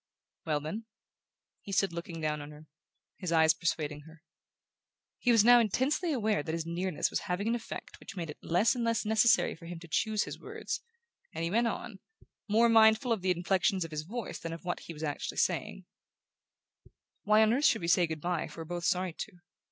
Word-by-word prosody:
"Well, 150 -2 +1
then?" 205 +10 -5 0.8
He 200 - -9
stood 195 -2 +1
looking 170 0 -6
down 150 -1 -1
on 145 - -8
her, 150 +1 -13 0.5
his 180 -3 -4
eyes 160 -1 +5
persuading 150 -3 -2
her. 160 0 -16 1.0
He 245 - +3
was 225 -2 +5
now 245 0 +8
intensely 270 - +1
aware 220 - +1
that 160 +2 -4
his 165 -1 -3
nearness 170 0 -1
was - - 0
having 185 +4 -1
an 230 - +2
effect 240 -1 -6
which - - -10
made 165 -4 -4
it - - -13
less 180 +7 +2
and 245 -2 -2
less 230 -1 0
necessary 220 +2 +4
for 165 - -12
him 175 0 -6
to 170 - -12
choose 215 +6 +1
his - - -7
words, - - -5 0.5
and 165 - -2
he 165 - -1
went 235 +3 +2
on, 225 -3 -5 0.5
more 225 +3 +5
mindful 225 +1 +5
of 220 -4 +1
the 185 - 0
inflections 185 +1 +1
of 165 - -9
his 155 -1 -3
voice 220 +9 -6
than 165 0 -5
of 165 - -9
what 175 - -2
he 170 - -9
was 150 - -8
actually 145 -2 -3
saying: - - -1 1.4
"Why 215 +1 +5
on 220 +1 +3
earth 280 +4 +1
should 225 - +4
we 170 - -3
say 175 0 +4
good 160 -1 -5
bye 175 -1 -1
if - - -12
we're 165 - -6
both 175 +1 -4
sorry 180 -1 +1
to? 185 +2 -7
180 Hz, 210 wpm, -30 LUFS, 165-220 Hz, 1.4 s, now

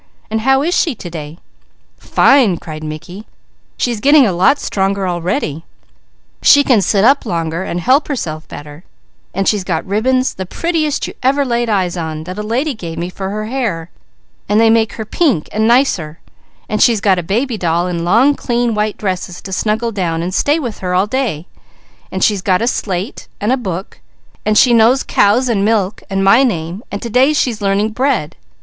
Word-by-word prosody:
And 220 0 -1
how 270 +3 +3
is 345 +3 0
she 315 -7 +1
to 175 -5 -9
day?" 155 -1 -7 0.6
"Fine!" 250 -10 +3
cried 155 -1 -8
Mickey. 165 +7 -8 0.5
"She 245 - 0
is 230 - -4
getting 285 +3 +5
a 205 - +1
lot 190 +12 +3
stronger 195 0 -1
already. 175 - -2 0.8
She 285 -1 +6
can 250 -7 +3
sit 195 +2 +1
up 275 +4 +4
longer 170 -4 -3
and 175 -2 -3
help 260 - +2
herself 160 - -4
better, 145 +3 -10 0.5
and 195 +1 -2
she's 205 -3 +1
got 170 -3 -2
ribbons, 255 +6 +1
the 190 -1 -6
prettiest 315 - -1
you - - -7
ever 275 +2 +2
laid 240 -2 -1
eyes 185 -4 0
on, 160 -2 -4
that 185 +5 -7
a - - -1
lady 250 +8 -1
gave 170 -7 -7
me 175 +2 -4
for 190 +1 -5
her 215 +1 -4
hair, 215 -9 -3 0.6
and 210 +1 +3
they 225 0 +5
make 225 -1 +2
her 220 - -6
pink 255 - 0
and 220 +1 +1
nicer; 215 - +1 0.5
and 215 - -2
she's 230 -3 +4
got 195 -2 +2
a - - -1
baby 230 +8 -1
doll 175 -3 0
in 175 -2 -3
long 230 +11 +4
clean 240 -3 -1
white 210 0 -1
dresses 185 -2 -4
to 190 - -7
snuggle 220 +4 -1
down 170 -5 -2
and 180 +2 -4
stay 290 - +2
with 245 -9 -5
her 180 -1 -2
all 185 +2 +3
day; 210 - -2 0.7
and 190 - -2
she's 205 -3 +2
got 185 -2 +1
a 230 - 0
slate, 195 -5 -3
and 210 +4 0
a - - +4
book, 190 -7 -6 0.5
and 215 0 +3
she 245 +1 +5
knows 235 +4 +4
'cow' 205 +3 +3
and 215 -5 +1
'milk' 210 -2 0
and 195 0 -1
my 225 +6 +5
name, 180 -6 -1
and 200 - -5
to 235 - -4
day 265 +6 +4
she 270 -4 +1
is 215 -2 -9
learning 200 +2 +1
'bread.' 230 - -1
210 Hz, 200 wpm, -16 LUFS, 180-245 Hz, 0.8 s, She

